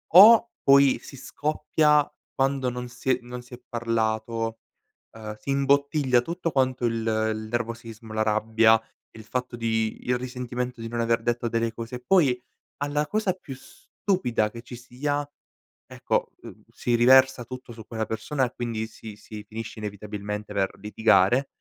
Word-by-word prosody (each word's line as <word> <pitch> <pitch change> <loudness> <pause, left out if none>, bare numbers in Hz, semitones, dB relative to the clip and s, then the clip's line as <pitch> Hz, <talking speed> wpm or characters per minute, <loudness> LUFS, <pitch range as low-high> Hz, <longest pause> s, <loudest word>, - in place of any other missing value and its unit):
o 230 +4 +9
poi 140 -1 +6
si 135 - -11
scoppia 150 +2 +1 0.2
quando 135 -1 +1
non 125 0 -5
si 125 +2 -6
è 125 - +2
non 125 0 -8
si 125 +1 -16
è 125 - -19
parlato, 115 -1 -1 0.5
ehm, 110 -1 -8
si 105 +6 -10
imbottiglia 140 -1 +3
tutto 170 +5 -3
quanto 130 -2 +1
il 115 -1 +1
il 110 -1 -1
nervosismo, 115 -1 -5
la 110 0 +1
rabbia, 110 +1 +4 0.4
il 110 - -10
fatto 125 +1 -3
di 110 -1 0
il 125 0 +2
risentimento 125 0 -4
di 115 - -5
non 120 +1 -2
aver 115 0 +1
detto 120 0 0
delle 115 0 -1
cose 115 +1 -6
e 125 - -9
poi 145 -10 +4 0.4
alla 145 +1 -1
cosa 210 +1 0
più 175 -6 -10
stupida 180 - -2
che 115 - -9
ci 120 +1 -10
sia 145 +4 -3 0.6
ecco, - - -1
uhm, - - -12
si 120 - -1
riversa 130 +1 +5
tutto 130 0 -9
su 110 -2 -11
quella 110 -1 -3
persona 110 +6 -2
e 125 - -6
quindi 115 -2 -3
si 110 -1 -11
si 105 0 -10
finisce 115 +1 -7
inevitabilmente 105 0 -5
per 95 -1 0
litigare 110 +4 +3
120 Hz, 160 wpm, -26 LUFS, 110-135 Hz, 0.6 s, o